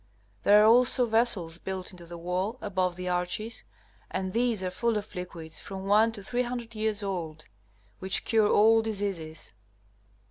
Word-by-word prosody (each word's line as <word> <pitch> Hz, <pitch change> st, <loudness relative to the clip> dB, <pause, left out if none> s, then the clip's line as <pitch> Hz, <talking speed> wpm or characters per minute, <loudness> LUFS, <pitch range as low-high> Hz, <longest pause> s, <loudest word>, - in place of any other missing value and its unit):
There 210 Hz, +1 st, +6 dB
are -, -, +6 dB
also 245 Hz, +2 st, +5 dB
vessels 220 Hz, -8 st, 0 dB
built 190 Hz, 0 st, -5 dB
into 175 Hz, -2 st, -13 dB
the 170 Hz, 0 st, -8 dB
wall 180 Hz, +7 st, -2 dB
above 185 Hz, -3 st, -1 dB
the 180 Hz, 0 st, -6 dB
arches, 180 Hz, +6 st, -2 dB, 0.5 s
and 190 Hz, -1 st, -3 dB
these 235 Hz, -4 st, +1 dB
are 185 Hz, -, -2 dB
full 230 Hz, +4 st, 0 dB
of 210 Hz, +1 st, -6 dB
liquids 170 Hz, -3 st, -7 dB
from 195 Hz, -1 st, -7 dB
one 215 Hz, +3 st, +4 dB
to 205 Hz, -3 st, -9 dB
300 240 Hz, +1 st, -3 dB
years 215 Hz, -1 st, -1 dB
old, 165 Hz, -6 st, -4 dB, 0.5 s
which 190 Hz, +1 st, 0 dB
cure 220 Hz, -2 st, +3 dB
all 225 Hz, +2 st, +5 dB
diseases. 195 Hz, -8 st, -4 dB
200 Hz, 155 wpm, -28 LUFS, 180-225 Hz, 0.5 s, There